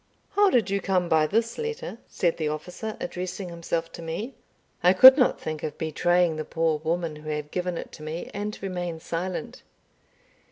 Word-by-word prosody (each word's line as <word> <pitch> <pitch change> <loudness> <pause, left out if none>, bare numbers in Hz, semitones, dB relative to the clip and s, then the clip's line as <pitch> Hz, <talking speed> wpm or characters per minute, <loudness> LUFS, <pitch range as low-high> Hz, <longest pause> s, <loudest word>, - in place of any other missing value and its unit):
"How 410 0 +4
did 235 - +2
you 200 0 0
come 185 -2 +1
by 155 -1 +4
this 230 - 0
letter?" 455 - -4
said 170 -2 0
the 155 - -1
officer, 180 +8 -5
addressing 180 +1 -5
himself 170 -1 -3
to - - -9
me. 170 +11 -4 0.5
I 180 +1 +6
could 260 +8 +11
not 260 -3 +2
think 155 -1 -5
of 150 -1 -5
betraying 170 +1 +1
the 155 - -2
poor 160 -1 0
woman 165 0 -2
who 155 0 -8
had 150 -1 -4
given 180 -1 -2
it - - -7
to - - -12
me, 155 +3 -5
and 205 +1 -4
remained 175 -4 -4
silent. 185 +8 -4
175 Hz, 185 wpm, -26 LUFS, 160-200 Hz, 0.5 s, could